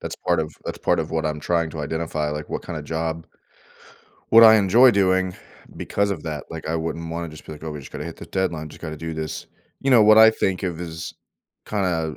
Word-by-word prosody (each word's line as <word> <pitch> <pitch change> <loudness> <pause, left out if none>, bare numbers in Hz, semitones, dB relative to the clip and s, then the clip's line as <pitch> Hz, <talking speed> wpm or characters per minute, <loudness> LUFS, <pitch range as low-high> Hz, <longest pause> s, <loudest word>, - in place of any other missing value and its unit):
That's - - -6
part 85 -2 +3
of 75 0 -4
that's - - -5
part - - +1
of - - -5
what 80 0 -1
I'm 75 -1 -2
trying 85 0 0
to 80 - -6
identify, 80 0 -2
like, 75 0 -5
what - - -5
kinda 80 -3 -5
job 80 +1 -4 1.1
what 115 +1 +9
I 110 -1 +9
enjoy 110 +6 +6
doing, 95 -3 +1 0.4
because 100 0 -1
of 100 - -4
that, 75 -3 -5
like, 80 -1 -7
I 80 - 0
wouldn't 80 0 -4
wanna 85 0 -4
just 75 -1 -12
be, - - -7
like, 75 - -12
"Oh, 80 - -5
we 75 - -6
just 70 - -11
gotta - - -6
hit - - -7
the - - -10
deadline. 85 -5 -2
Just - - -14
gotta 80 -2 -6
do 80 +1 -6
this," 80 0 -5 0.3
you 135 - 0
know, 120 -4 +7
what 110 +1 +7
I 110 0 +9
think 95 -4 -1
of 90 -3 -3
is 80 -1 -6 0.5
kinda 85 -6 -1
80 Hz, 235 wpm, -23 LUFS, 80-95 Hz, 1.1 s, what